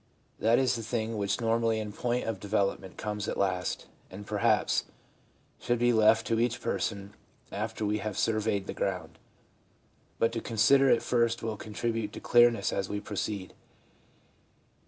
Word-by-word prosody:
That 115 +2 +4
is 130 -1 +2
the 115 - -4
thing 115 0 -2
which 100 +1 -1
normally 115 -1 +1
in 105 -1 -4
point 120 +3 -1
of 115 -4 -3
develop 100 0 0
ment 95 -1 -12
comes 105 -1 -3
last, 90 -2 -1 0.2
and 100 +2 -9
perhaps 105 -1 +1 0.7
should 120 - 0
be 120 +1 +3
left 110 0 +4
to 115 -1 0
each 120 0 +1
person 100 -3 -3 0.4
after 110 - -3
we 105 +1 0
have 105 -1 -4
surveyed 110 -3 0
the - - -5
ground; 95 -2 -3 1.0
but 115 - +2
to 115 -1 -3
con 115 - -6
sider 135 +5 +5
it - - +3
first 115 -1 +1
will 110 -1 -2
contribute 110 0 -3
to - - -6
clearness 120 -4 +4
as 95 0 -2
we 105 - -2
proceed. 100 -1 -4
110 Hz, 160 wpm, -29 LUFS, 100-115 Hz, 1.0 s, sider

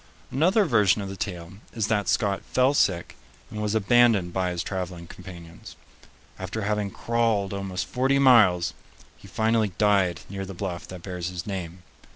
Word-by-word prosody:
Another 185 - +3
version 105 - +3
of 95 - -6
the 95 - -6
tale 90 -3 -5 0.2
is 110 -3 -1
that 105 -2 0
Scott 105 -4 +1
fell 130 +2 +2
sick 90 -10 +1 0.4
and 105 - -5
was 105 0 -1
abandoned 110 -4 +3
by 95 -1 0
his 90 0 -3
traveling 90 -3 -5
companions. 85 -2 -12 0.6
After 110 - -4
having 105 0 -1
crawled 115 -3 0
almost 95 -1 -3
forty 135 +2 +1
miles, 110 -10 +5 0.4
he - - -16
finally 110 -2 +1
died 95 -4 +2
near 95 0 -5
the 95 0 -8
bluff 90 -2 -5
that 90 -2 -10
bears 90 -2 -4
his 90 -1 -6
name. 90 -3 -6
100 Hz, 165 wpm, -25 LUFS, 90-110 Hz, 0.6 s, miles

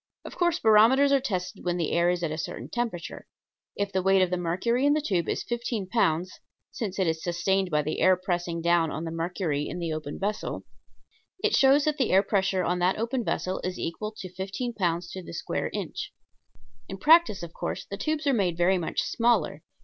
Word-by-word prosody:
Of - - -8
course 345 -2 +2
barometers 230 +5 +5
are 275 - +5
tested 185 -8 -4
when 175 0 -1
the 165 -3 -1
air 170 +1 +3
is 175 -1 -1
at 160 - -1
a 155 - -3
certain - - -5
temperature. 230 -8 -4 0.5
If 200 0 -2
the 190 - 0
weight 190 0 +4
of 185 - -1
mercury 190 +9 0
in 290 +1 +4
the 305 - +2
tube 185 - -1
is - - -1
fifteen 235 -3 -3
pounds, 180 -4 0 0.3
since 205 -5 -4
it 190 - +2
is 160 -1 -1
sustained 185 +2 0
by 150 -2 +1
the 155 +2 -3
air 185 -1 +5
pressing 175 -2 -2
down 170 -1 +3
on 155 +2 -4
the 165 - -4
mercury 165 -3 -2
in - - -5
the 170 -2 -2
open 150 -2 -5
vessel, 205 +2 -3 0.8
it - - +2
shows 275 +2 +5
that 305 -1 0
the 260 - +2
air 190 +1 +5
pressure 190 -2 +1
on 180 +1 0
that 180 +2 +2
open 235 +3 -1
vessel 185 -3 -2
is 185 0 -3
equal 210 +6 -4
to 185 -1 -8
fifteen 195 +6 -4
pounds 175 -4 -1
to 185 - -6
the 170 - -10
square - - -3
inch. - - -5 0.8
In 195 - -5
practice, 310 - +5
of 170 -1 -8
course, - - -4
the 200 - -6
tubes 310 +7 -2
are 280 - +3
made 185 -7 +1
very 180 +2 +3
much 165 - -1
smaller. 235 0 +1
185 Hz, 210 wpm, -27 LUFS, 170-230 Hz, 0.8 s, barometers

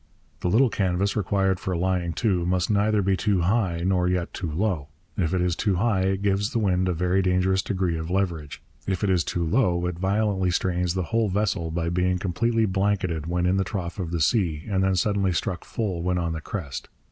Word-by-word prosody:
The - - -2
little 115 +5 +4
canvas 95 0 0
required 95 -2 +1
for 95 -2 -2
lying 90 -1 0
to 95 -6 +1
must 90 +2 0
neither 105 0 +2
be 95 0 +2
too 100 -2 +1
high 90 -3 +1
nor 90 -1 +2
yet 90 -1 -1
too 85 - -4
low. 85 -4 -1 0.3
If 85 -3 0
it 90 - +1
is 90 -1 +1
too 100 -3 0
high, 100 0 +1
it 95 +1 0
gives 100 +1 +1
the 125 - -2
wind 95 -4 +1
a - - +1
very 90 +3 +1
dangerous 95 +1 +2
degree 90 -5 -1
of 80 +1 -5
leverage. 85 -6 -2 0.2
If 95 -1 -1
it 100 - +2
is 90 -3 +2
too 85 +2 -2
low, 90 -2 +1
it 90 -1 -3
violently 95 -1 +1
strains 90 0 0
the 95 - 0
whole 115 -2 +2
vessel 95 -4 0
by 85 +1 -2
being 90 +1 +1
completely 110 +5 +1
blanketed 95 -5 0
when 90 +1 0
in 95 +2 +2
the 95 - +2
trough 95 -1 -5
of 90 -3 -3
the 85 -1 -2
sea 80 -4 +1
and 95 -2 +1
then 95 0 +2
suddenly 100 0 +1
struck 90 +1 -2
full 95 -7 -3
when 90 +1 0
on 85 -2 -1
the 80 - -5
crest. 75 -7 -6
95 Hz, 215 wpm, -25 LUFS, 85-100 Hz, 0.3 s, little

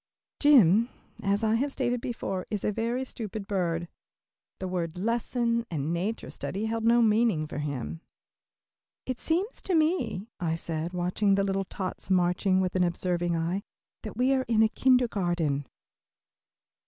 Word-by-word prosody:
Jim, 235 - +6 0.3
as 200 +2 +1
I 220 0 +3
have 275 +5 +1
stated 245 -3 -1
before, 195 -6 -3
is 210 -3 -3
a - - +1
very 235 +4 -1
stupid 215 -4 -6
bird. 175 -4 -1 0.7
The 190 - -4
words 175 -2 -3
"lesson" 235 +2 0
and 155 0 -2
"nature 195 +7 -3
study" 200 +3 -4
held 225 0 -2
no 235 +1 +5
meaning 215 -7 +3
for 150 - -6
him. 130 - -4 1.0
"It 255 -1 -3
seems 370 +8 -1
to 370 - 0
me," 310 - +1
I 165 -3 0
said, 165 0 -3
watching 180 +3 +1
the 195 - +2
little 195 0 0
tots 185 0 -5
marching 185 +1 +3
with 185 -1 -1
an 185 - +3
observing 175 0 0
eye, 170 +4 -1 0.4
"that 215 - -8
we 255 +2 +3
are 260 -1 +2
in 225 -1 +4
a 220 - +4
kindergarten." 175 - +1
200 Hz, 155 wpm, -28 LUFS, 175-235 Hz, 1.0 s, Jim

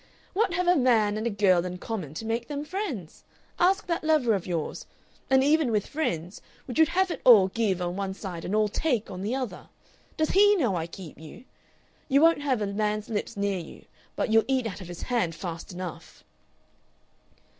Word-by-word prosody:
What 385 -3 +1
have 360 0 0
a 355 - +5
man 230 -7 +3
and 215 +2 -2
a - - +1
girl 190 -4 +3
in 180 0 -5
common 180 -8 -5
to 225 - -5
make 230 +1 -2
them 290 0 -4
friends? 300 - -5 0.4
Ask 385 +4 +3
that 335 -2 -2
lover 305 -8 +3
of 195 -3 -2
yours! 170 -4 -3 0.4
And 265 0 +5
even 295 -2 +3
with 210 -2 +1
friends, 180 - -3 0.2
would 255 +4 -4
you 320 - +7
have 375 +2 +1
it - - -5
all 210 -7 +7
Give 190 -4 0
on 175 0 -3
one 195 -1 -3
side 180 -5 -7
and 200 - -2
all 215 0 +3
Take 240 0 -1
on 185 -1 -6
the 215 +6 -1
other?... 255 -4 -5 0.5
Does 315 0 +1
HE 410 +1 +6
know 245 - +1
I 165 -1 -2
keep 170 -2 -11
you?... 160 +9 -12 0.7
You 275 0 +5
won't 330 -1 +5
have 260 -7 0
a - - 0
man's 210 +1 -2
lips 210 -2 -3
near 200 -2 0
you, 165 - -11 0.3
but - - -1
you'll 225 0 +5
eat 260 -2 +1
out 205 -2 -5
of 180 - -8
his 175 -1 -8
hand 230 -10 0
fast 165 0 -6
enough." 175 -2 -8
220 Hz, 205 wpm, -27 LUFS, 185-285 Hz, 0.7 s, you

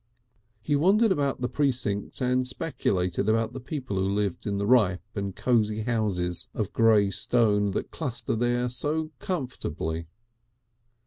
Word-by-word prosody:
He 145 +6 0
wandered 200 +9 +4
about 140 -7 0
the 125 - +1
precincts 125 -7 -1
and 125 0 +1
speculated 100 - -1
about 115 +1 +1
the 130 - -5
people 130 -5 -4
who 95 +1 +1
lived 100 -2 -1
in 100 -1 -1
the 100 - -1
ripe 100 -7 +3
and 100 -2 -4
cosy 110 -3 +1
houses 105 -7 0
of - - -2
grey 110 -3 +4
stone 105 0 +2
that - - -3
cluster 120 -8 -3
there 120 +1 +1
so 155 +5 -1
comfortably. 85 - -3
115 Hz, 140 wpm, -27 LUFS, 100-130 Hz, -, wandered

